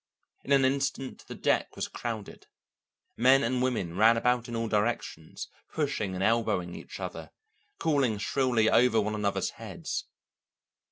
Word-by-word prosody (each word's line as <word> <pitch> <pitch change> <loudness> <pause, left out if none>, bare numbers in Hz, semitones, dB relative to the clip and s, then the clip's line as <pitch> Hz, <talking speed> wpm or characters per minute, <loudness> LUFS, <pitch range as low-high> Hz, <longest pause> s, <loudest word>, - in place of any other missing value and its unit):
In 140 - -6
an 135 -1 +5
instant 135 -1 -1
the - - -7
deck - - 0
was - - -2
crowded. 110 -4 -6 0.7
Men 130 +3 +5
and 125 +2 0
women 110 -10 -1
ran 115 +4 +5
about 125 +1 +1
in 120 - -4
all 115 0 -1
directions, 105 -7 -2 0.2
pushing 135 -11 -1
and 95 - -2
elbowing 105 -6 +1
each - - -9
other, - - -6 0.5
calling 140 -9 +1
shrilly 120 +1 +1
over 115 -1 +4
one 105 0 0
another's 105 -2 -1
heads. - - -5
115 Hz, 145 wpm, -29 LUFS, 105-130 Hz, 0.7 s, an